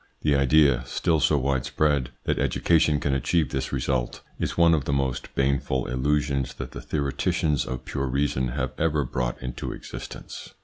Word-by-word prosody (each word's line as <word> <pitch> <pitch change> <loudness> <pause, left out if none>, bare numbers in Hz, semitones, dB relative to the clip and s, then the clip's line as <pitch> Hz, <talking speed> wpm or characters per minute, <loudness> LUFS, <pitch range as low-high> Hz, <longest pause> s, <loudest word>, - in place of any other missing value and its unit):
The 75 - +2
idea, 70 -2 +4
still 80 -2 +1
so 75 0 +3
wide 65 -1 0
spread, 70 -3 +1
that - - 0
education 80 -3 +2
can 70 - 0
achieve 75 +2 +1
this 65 -1 -2
result, 65 -2 -1 0.2
is - - -2
one 85 -1 +6
of 75 -5 +1
the - - -1
most 65 -2 -2
baneful 65 -2 +1
illusions 70 +1 0
that - - -6
the - - -7
theoreticians 75 +1 0
of 65 0 -5
pure 70 -2 -2
reason 65 -1 0
have 65 +1 -2
ever 75 -2 +2
brought - - -2
into 60 -1 -4
existence. - - -9
70 Hz, 170 wpm, -25 LUFS, 65-75 Hz, 0.2 s, one